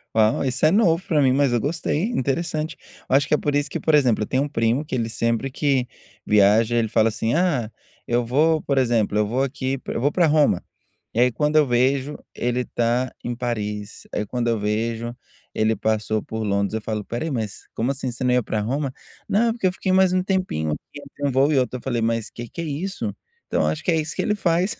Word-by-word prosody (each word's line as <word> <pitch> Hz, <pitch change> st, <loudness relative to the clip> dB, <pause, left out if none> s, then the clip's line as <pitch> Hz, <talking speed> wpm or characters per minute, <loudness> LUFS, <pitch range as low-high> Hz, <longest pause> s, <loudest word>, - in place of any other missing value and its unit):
Uau, 110 Hz, +3 st, +3 dB
isso 130 Hz, +3 st, +1 dB
é 155 Hz, -, +5 dB
novo 185 Hz, -4 st, +3 dB
pra 155 Hz, -7 st, +2 dB
mim, 130 Hz, -1 st, +4 dB
mas 140 Hz, -1 st, +3 dB
eu 120 Hz, -, +2 dB
gostei. 155 Hz, -, -1 dB
Interessante. 155 Hz, -, -2 dB, 0.3 s
Eu 130 Hz, -, +3 dB
acho 145 Hz, +1 st, +3 dB
que -, -, 0 dB
é -, -, +5 dB
por 145 Hz, -1 st, -1 dB
isso 145 Hz, 0 st, +1 dB
que -, -, -3 dB
por 160 Hz, -, +3 dB
exemplo, 125 Hz, -7 st, +3 dB
eu -, -, -4 dB
tenho 130 Hz, +2 st, +1 dB
um 145 Hz, -, -4 dB
primo 120 Hz, +2 st, 0 dB
que 140 Hz, -, -4 dB
ele 115 Hz, -2 st, -1 dB
sempre 115 Hz, +3 st, -1 dB
que 130 Hz, -2 st, +1 dB, 0.4 s
viaja, 105 Hz, +3 st, +4 dB
ele 115 Hz, -1 st, +2 dB
fala 110 Hz, +1 st, +3 dB
assim: 110 Hz, +1 st, -1 dB
"Ah, 150 Hz, -10 st, +1 dB, 0.4 s
eu 120 Hz, 0 st, +1 dB
vou, 155 Hz, +6 st, +2 dB
por 140 Hz, -1 st, -1 dB
exemplo, 115 Hz, -5 st, +2 dB
eu 105 Hz, -, +3 dB
vou 130 Hz, +5 st, 0 dB
aqui 135 Hz, 0 st, -2 dB
eu -, -, -2 dB
vou 145 Hz, +3 st, +2 dB
para 175 Hz, +1 st, +3 dB
Roma", 150 Hz, -, +3 dB, 0.5 s
e 115 Hz, -, -1 dB
aí 125 Hz, 0 st, +5 dB
quando 150 Hz, +6 st, 0 dB
eu 150 Hz, -, +6 dB
vejo 130 Hz, +4 st, +1 dB, 0.2 s
ele 125 Hz, +1 st, -1 dB
tá 120 Hz, +2 st, 0 dB
em 120 Hz, -, -3 dB
Paris, 105 Hz, -4 st, -4 dB
aí 105 Hz, -, -1 dB
quando 120 Hz, +3 st, -2 dB
eu 115 Hz, -2 st, +1 dB
vejo 115 Hz, +3 st, -2 dB, 0.4 s
ele 110 Hz, +1 st, +2 dB
passou 110 Hz, 0 st, 0 dB
por 110 Hz, 0 st, -4 dB
Londres 100 Hz, 0 st, 0 dB
eu 110 Hz, -, -2 dB
falo: 110 Hz, -1 st, -3 dB
"Espera 120 Hz, +7 st, -4 dB
aí, 165 Hz, -, -3 dB
mas, 110 Hz, -5 st, -4 dB
como 120 Hz, +4 st, 0 dB
assim, 135 Hz, -2 st, -3 dB
você 120 Hz, +2 st, -6 dB
não 125 Hz, -, +2 dB
ia 125 Hz, -2 st, +3 dB
para 110 Hz, -, -2 dB
Roma? 135 Hz, +4 st, -2 dB, 0.4 s
'Não, 230 Hz, +3 st, +3 dB
porque 225 Hz, -5 st, 0 dB
eu 180 Hz, -, 0 dB
fiquei 190 Hz, -, -2 dB
mais 190 Hz, -1 st, +4 dB
um 185 Hz, 0 st, +2 dB
tempinho 185 Hz, -, -1 dB
aqui 145 Hz, -, -7 dB
entre 145 Hz, 0 st, -5 dB
um -, -, 0 dB
voo 135 Hz, +3 st, +3 dB
e 145 Hz, -, +2 dB
outro'", 125 Hz, 0 st, -1 dB
aí -, -, -10 dB
eu -, -, -19 dB
falei: 120 Hz, -3 st, -1 dB
"Mas 115 Hz, 0 st, 0 dB
que 120 Hz, 0 st, -8 dB
que 170 Hz, -, -6 dB
é 170 Hz, -, -4 dB
isso?". 165 Hz, +7 st, -4 dB, 0.3 s
Então -, -, 0 dB
eu -, -, +1 dB
acho 155 Hz, -, -2 dB
que -, -, +2 dB
é 165 Hz, -, +3 dB
isso 155 Hz, -1 st, -2 dB
que -, -, 0 dB
ele 210 Hz, -, +1 dB
faz, 180 Hz, 0 st, +1 dB
130 Hz, 245 wpm, -23 LUFS, 115-150 Hz, 0.5 s, eu